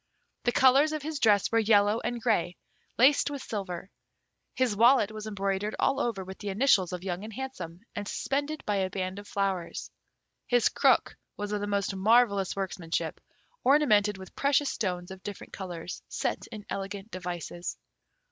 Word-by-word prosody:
The 240 - +4
colours 270 +5 +5
of 305 -2 -3
his 310 -1 -3
dress 205 -5 +4
were 230 - +4
yellow 210 0 +4
and 240 0 -3
grey, 215 -7 0 0.4
laced 270 +5 +5
with 285 -2 -5
silver. 190 -3 -5 0.6
His 255 -5 +1
wallet 235 -1 +5
was 215 0 -7
embroidered 200 0 -2
all 270 - +2
over 210 -5 -1
with 190 +1 -9
the 205 - -4
initials 195 -4 +3
of 180 -1 -5
Young 185 0 -3
and 220 - -7
Handsome, 190 -9 -6
and 205 -1 -4
suspended 290 +6 -2
by 205 -1 0
a 190 -1 0
band 185 0 -3
of 205 - -11
flowers. 195 -4 -2 0.6
His 245 -2 +4
crook - - +3 0.2
was 205 0 -4
of 210 -1 -1
the 205 - -2
most 200 -1 -1
marvellous 200 -1 +3
workmanship, 185 -4 -3 0.4
ornamented 215 -8 +4
with 190 -1 -12
precious 280 0 +2
stones 180 -5 -3
of 190 0 -9
different 205 -1 -8
colours 175 -3 -6
set - - -3
in 210 -3 -9
elegant 195 +2 -5
devices. 175 -1 -5
205 Hz, 165 wpm, -29 LUFS, 190-240 Hz, 0.6 s, colours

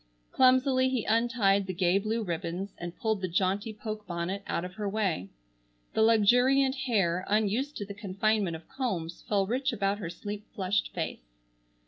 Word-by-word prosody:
Clumsily 260 0 +4
he 255 -4 -1
untied 220 -4 +2
the 185 - -4
gay 180 +1 +3
blue 220 +2 -1
ribbons 175 +2 -4
and 175 0 -6
pulled 220 -3 -1
the 185 - -1
jaunty 190 +4 0
poke 215 0 -6
bonnet 175 +3 -3
out 170 - -1
of 180 - -8
her 205 0 -3
way. 195 - -1 0.6
The - - +1
luxuriant 245 +5 +5
hair, 200 -10 0
unused 220 +7 0
to 205 - -4
the 200 - -7
confinement 200 -2 0
of 160 - -11
combs, 190 -11 -3
fell 200 -2 +2
rich 260 +6 0
about 200 -2 0
her 170 -5 -4
sleep 205 +4 -7
flushed 195 +1 0
face. - - -5
205 Hz, 165 wpm, -29 LUFS, 185-230 Hz, 0.6 s, luxuriant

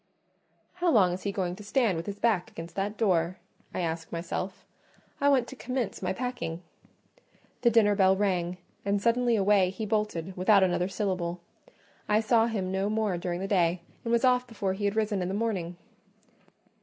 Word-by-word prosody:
'" - - -42
"How 355 - +3
long 195 - +4
is 185 - -5
he 200 - -2
going 185 -3 -2
to 210 - -10
stand 215 -2 +1
with 165 +3 -5
his 200 0 -4
back 205 -5 +1
against 165 +1 -9
that 205 +2 -2
door?" 180 -5 +1 0.3
I - - -3
asked 165 -1 -3
myself; 175 +2 -4 0.5
"I 285 - +4
want 260 -4 +3
to - - -9
commence 250 -5 -3
my 185 -1 -1
packing." 190 -7 -4 1.0
The 240 - +5
dinner 215 -3 +4
bell 190 -1 +4
rang, 180 -3 0 0.3
and 200 0 +1
suddenly 235 +2 +2
away 200 -2 +4
he 195 +4 -5
bolted, 205 -5 -2
without 195 +2 +5
another 180 -1 +1
syllable: 185 -3 -2 0.7
I 210 +1 +4
saw 225 +1 +3
him 195 -5 -2
no 190 +2 0
more 215 -3 0
during 175 0 -3
the 195 - -2
day, 175 -3 +2 0.2
and 230 - -2
was 235 +2 +3
off 250 0 +3
before 205 -5 -2
he 205 +2 -3
had 200 +1 0
risen 215 -3 0
in 180 - -1
the 190 - -2
morning. 190 -6 -2
200 Hz, 190 wpm, -28 LUFS, 180-220 Hz, 1.0 s, The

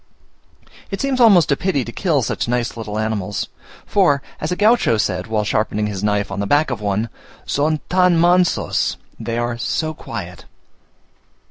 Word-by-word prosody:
It 195 - -4
seems 275 -2 0
almost 190 -10 +6
a - - +4
pity 145 -6 -1
to 115 - -6
kill 155 -3 0
such - - -2
nice 120 0 -1
little 110 -2 -5
animals, 110 -2 -2 0.4
for 145 -9 +2 0.2
as 155 - -3
a - - +1
Gaucho 210 - +3
said, 95 -3 -1
while 110 -1 0
sharpening 105 0 0
his 100 -2 -4
knife 105 -1 0
on 100 - -4
the 100 - -1
back 145 +2 +2
of 115 -4 -4
one, 105 +2 -1 0.4
"Son 150 +1 0
tan 180 -2 +3
mansos" 175 +1 +2 0.2
(they 115 0 -3
are 120 0 -2
so 155 +6 -1
quiet). 90 - -8
120 Hz, 165 wpm, -20 LUFS, 105-170 Hz, 0.4 s, almost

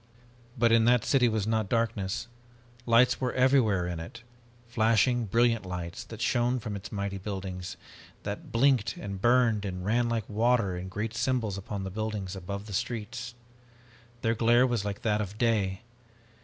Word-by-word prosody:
"But 115 0 +3
in 115 -1 +5
that 120 -1 +4
city 125 -4 +4
was 110 -2 -1
not 110 -2 0
darkness! 115 -3 -1 0.6
Lights 120 +2 +4
were 125 -1 0
everywhere 125 -8 +3
in 85 -2 -4
it, 115 +9 -9 0.4
flashing 115 +1 +2
brilliant 115 +1 +2
lights 90 -2 -5
that - - -9
shone 120 +1 +2
from 105 -2 -5
its 100 -1 -8
mighty 100 -1 -3
buildings 95 -2 -5 0.4
and - - -32
that 100 0 -6
blinked 125 -2 +2
and 100 -1 -6
burned 120 -3 +3
and 90 -2 -4
ran 120 +3 +2
like 115 -3 -2
water 110 -3 +1
in 90 +1 -6
great 105 +3 -3
symbols 120 -4 0
upon 100 0 -5
the 95 - -5
buildings 105 -2 -4
above 100 +2 -6
the 105 - -8
streets. 120 +4 -4 0.9
Their 115 - +2
glare 120 +2 +4
was 120 -5 0
like 100 -1 -5
that 105 -2 +1
of 105 0 -6
day! 105 -5 +1
110 Hz, 170 wpm, -28 LUFS, 100-120 Hz, 0.9 s, in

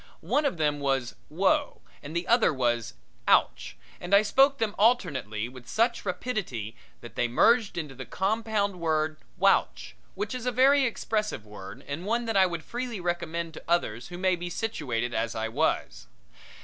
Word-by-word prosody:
One 295 +1 +1
of 275 - 0
them 150 -2 +1
was 135 -3 0 0.2
"Whoa" 280 - +1 0.2
and 150 +3 -8
the 170 +1 -1
other 235 0 +4
was 120 -5 -1 0.3
"Ouch," 60 0 +2 0.2
and 175 +3 +2
I 200 - +6
spoke 270 +6 +4
them 225 -5 -1
alternately 140 - +1
with 125 -1 -13
such 230 +3 +1
rapidity 180 - -3 0.3
that - - -10
they 120 - 0
merged 225 - +3
into 150 -5 -4
the 130 0 -9
compound 205 -1 -1
word 155 -2 0 0.2
"Whouch," 195 +1 +2 0.2
which 415 - -3
is 250 -1 -4
a - - +2
very 270 +3 +5
expressive 210 - -2
word 100 -2 -10
and 145 +5 -4
one 235 +2 0
that 225 -2 -2
I 190 -1 +6
would 170 -3 -5
freely 240 0 -4
recommend 170 -1 -3
to - - -10
others 125 -9 0
who 175 - -8
may 185 0 +2
be 175 0 -5
situated 130 - -2
as 115 0 -1
I 110 0 -2
was. 110 - -1
175 Hz, 175 wpm, -27 LUFS, -, 0.3 s, I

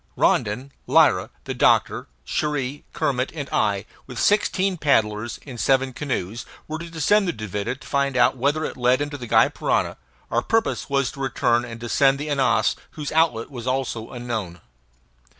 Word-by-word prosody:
Rondon, 125 +7 +1 0.2
Lyra, - - +4
the - - -4
doctor, - - +2 0.2
Cherrie, 145 - -2
Kermit, 130 -1 -1
and 145 -3 -4
I, 100 -2 +1 0.2
with 125 -2 -8
sixteen 195 - +2
paddlers, 110 -7 +1
in 125 -4 -8
seven 135 0 +2
canoes, 120 -6 -3 0.2
were 155 +1 -4
to 170 0 -7
descend 180 +6 +2
the - - +2
Duvida, 105 - -4
and 130 - -4
find 140 -2 0
out 125 - +4
whether 145 +5 0
it - - -5
led 125 +1 +3
into 145 0 -3
the 120 - -7
Gy - - +5
Parana, - - -1 0.3
our 120 - +2
purpose 225 - 0
was 140 -1 +1
to 135 - -13
return 120 -2 +1
and 115 -1 -8
descend 135 +4 +3
the 150 +2 -5
Ananas, 115 -6 +2 0.2
whose 150 -2 -4
outlet 155 -7 +1
was 120 -2 -7
also 130 -3 -2
unknown. 110 -9 -5
130 Hz, 170 wpm, -23 LUFS, 115-145 Hz, 0.3 s, Gy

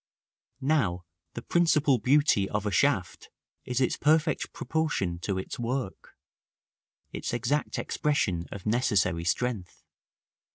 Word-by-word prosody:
Now 100 - +1 0.3
the 120 - -6
principal 155 -6 +3
beauty 130 -7 +3
of 105 0 -2
a 105 - 0
shaft - - 0 0.4
is 125 0 -1
its 130 - +1
perfect 155 +1 +2
proportion 145 - -2
to 95 +2 -2
its 95 - -5
work, 120 -3 -4 1.0
its - - -4
exact 125 +5 -1
expression 95 - -1
of 100 - -8
necessary 105 -7 +1
strength. 95 +1 -2
120 Hz, 115 wpm, -28 LUFS, 95-145 Hz, 1.0 s, principal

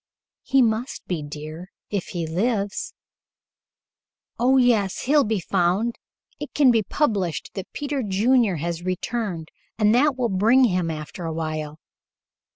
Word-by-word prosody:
"He 270 -1 +3
must 230 +3 -1
be, 175 -4 -3
dear, 155 +4 -8 0.2
if 200 -4 -2
he 170 -2 -3
lives." 200 +4 -1 1.4
"Oh, 255 +3 +4
yes. 225 -7 +2
He'll 285 +2 +4
be 215 -3 0
found. 190 +6 0 0.4
It - - -7
can 275 -4 +6
be 225 -2 +3
published 200 - -1
that 195 -2 -7
Peter 285 -1 -3
Junior 215 0 +2
has 170 +2 -3
returned, 185 -2 -3 0.3
and 215 -1 +4
that 265 +2 +3
will 245 -2 +1
bring 220 +7 +4
him 180 -7 +1
after 155 +3 -6
a 165 - -2
while. 155 -2 -4
200 Hz, 140 wpm, -23 LUFS, 170-240 Hz, 1.4 s, can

